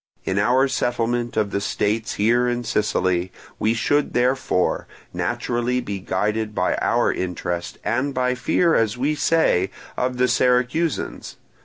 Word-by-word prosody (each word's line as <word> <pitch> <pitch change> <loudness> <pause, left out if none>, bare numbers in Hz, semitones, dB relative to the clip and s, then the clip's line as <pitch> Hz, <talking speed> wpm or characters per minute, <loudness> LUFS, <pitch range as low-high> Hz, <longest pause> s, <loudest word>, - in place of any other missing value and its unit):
In 95 +1 0
our 125 +6 +3
settlement 120 -2 -1
of 105 -2 +1
the 100 - -1
states 110 +2 -1
here 120 +4 +2
in 120 0 -2
Sicily, 95 -5 0 0.3
we 110 +2 +1
should 145 +5 +1
therefore; 125 -7 +1 0.3
naturally 120 +1 -1
be 100 -5 -4
guided 105 +3 -1
by - - +1
our - - +2
interest, 90 -1 -4
and 130 +4 0
by 125 -1 0
fear, 160 +7 +2
as 115 -2 +1
we 140 +5 +1
say, 145 - +2 0.3
of 125 0 -1
the 125 +1 +3
Syracusans. 125 +6 0
120 Hz, 140 wpm, -22 LUFS, 105-125 Hz, 0.3 s, our